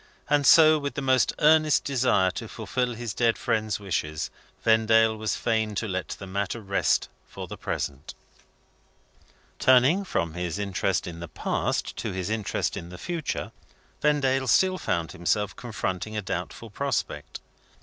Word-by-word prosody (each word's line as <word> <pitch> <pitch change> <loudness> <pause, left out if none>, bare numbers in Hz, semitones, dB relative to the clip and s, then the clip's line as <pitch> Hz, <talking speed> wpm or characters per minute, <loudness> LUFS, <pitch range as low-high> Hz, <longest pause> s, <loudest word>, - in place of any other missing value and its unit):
And 145 -2 +3
so, 155 -1 +7
with 140 -1 -4
the 140 - -2
most 130 -2 +3
earnest 155 0 +4
desire 125 -9 +2
to 115 - -6
fulfil 120 +3 -2
his 115 -2 -5
dead 115 -2 +2
friend's 110 -2 -1
wishes, 80 -6 -3 0.3
Vendale 110 0 +4
was 110 0 -2
fain 110 -2 0
to 110 - -2
let 95 -2 -3
the 100 - -7
matter 100 +3 -3
rest 100 -2 +1 0.2
for - - -8
the - - -7
present. 70 +1 -4 1.4
Turning 130 +9 +5
from 85 - -2
his 90 +1 -3
interest 100 -1 -1
in 85 -1 -7
the 85 - -6
past - - -2
to - - -3
his 95 +2 -3
interest 110 -4 -1
in 85 - -7
the 90 - -9
future, 170 - -4 0.5
Vendale 135 -3 +2
still 185 +9 +3
found 85 -3 -1
himself 100 +3 -1
confronting 110 -3 -4
a 105 - -2
doubtful 95 +4 -5
prospect. 140 +6 -3
110 Hz, 150 wpm, -26 LUFS, 95-130 Hz, 1.4 s, so